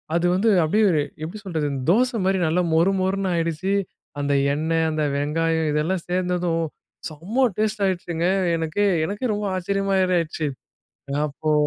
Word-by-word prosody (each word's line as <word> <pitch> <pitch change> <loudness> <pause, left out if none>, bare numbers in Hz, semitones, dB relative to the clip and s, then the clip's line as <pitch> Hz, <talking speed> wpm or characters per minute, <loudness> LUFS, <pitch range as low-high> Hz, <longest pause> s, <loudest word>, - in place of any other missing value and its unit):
அது 170 - +1
வந்து 220 +4 +2
அப்படியே 210 +7 +3
ஒரு 155 -3 +2 0.2
எப்படி 175 +7 -6
சொல்றது 160 -5 -1 0.2
தோசை 245 +3 +2
மாதிரி 190 -1 +2
நல்லா 175 +3 +1
மொறு 170 +4 +4
மொறுன்னு 190 0 0
ஆயிடுச்சு. 165 +3 -1 0.5
அந்த 145 0 0 0.2
எண்ணெய், 160 +1 +1
அந்த 155 -1 -1
வெங்காயம் 160 +2 0
இதெல்லாம் 165 +4 -1
சேர்ந்ததும் 180 -2 0 0.5
செம 180 - -3 0.2
டேஸ்ட் 215 -1 0
ஆயிடுச்சுங்க. 175 -2 -1 0.3
எனக்கே 165 +6 0 0.2
எனக்கே 210 +6 -2
ரொம்ப 210 0 -2
ஆச்சரியமாரி 190 0 +1
ஆயிடுச்சு. 155 -1 -2 0.8
அப்போ 155 +2 -3
175 Hz, 140 wpm, -23 LUFS, 160-195 Hz, 0.8 s, மொறு